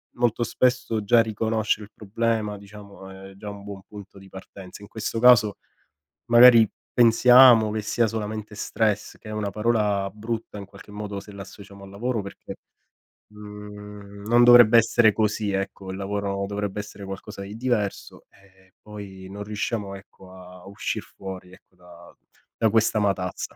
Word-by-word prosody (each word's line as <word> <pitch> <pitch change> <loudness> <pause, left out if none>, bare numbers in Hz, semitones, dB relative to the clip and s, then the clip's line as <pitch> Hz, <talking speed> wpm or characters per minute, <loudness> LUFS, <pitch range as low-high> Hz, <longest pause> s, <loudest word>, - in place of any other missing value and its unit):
molto 120 -1 0
spesso 125 -4 0
già 115 +3 +4
riconoscere 110 -1 -2
il 105 - -22
problema 110 0 -2
diciamo 100 -1 -13
è 95 0 -12
già 105 +1 -9
un 100 -1 -10
buon 100 -1 -9
punto 100 -1 -12
di 95 0 -16
partenza. 95 +1 -12
In 105 - -11
questo 110 +1 -4
caso 115 -4 +5 0.7
magari 120 -2 +7 0.2
pensiamo 120 -1 +6
che 110 0 -3
sia 115 +3 0
solamente 110 -1 -5
stress, 105 -1 -2
che 110 - -13
è - - -6
una 105 -1 -3
parola 105 -2 0
brutta 110 0 -6
in 100 - -8
qualche 100 +1 -16
modo 105 -1 -6
se 105 - -14
la 100 -1 -9
associamo 100 +1 -14
al - - -13
lavoro, 115 +3 -3
perché, 100 0 -10 0.7
mhmm, 105 -1 -11
non 120 +1 +5
dovrebbe 120 -1 +8
essere 115 -1 +4
così 105 -1 -1
ecco, 95 0 -4
il 95 - -7
lavoro 100 0 -3
dovrebbe 105 0 -4
essere 100 -1 -9
qualcosa 95 0 -8
di 100 +2 -8
diverso, 115 -5 -3
e 95 -1 -25
poi 100 -3 -10
non 100 +1 -7
riusciamo 105 -1 -4
ecco 95 -1 -15
a 90 -1 -14
uscir 100 - -4
fuori, 95 -1 -10
ecco, 95 - -21 0.8
da 110 - +1
questa 110 -1 +2
matazza. 95 -3 -2
105 Hz, 160 wpm, -24 LUFS, 100-110 Hz, 0.8 s, dovrebbe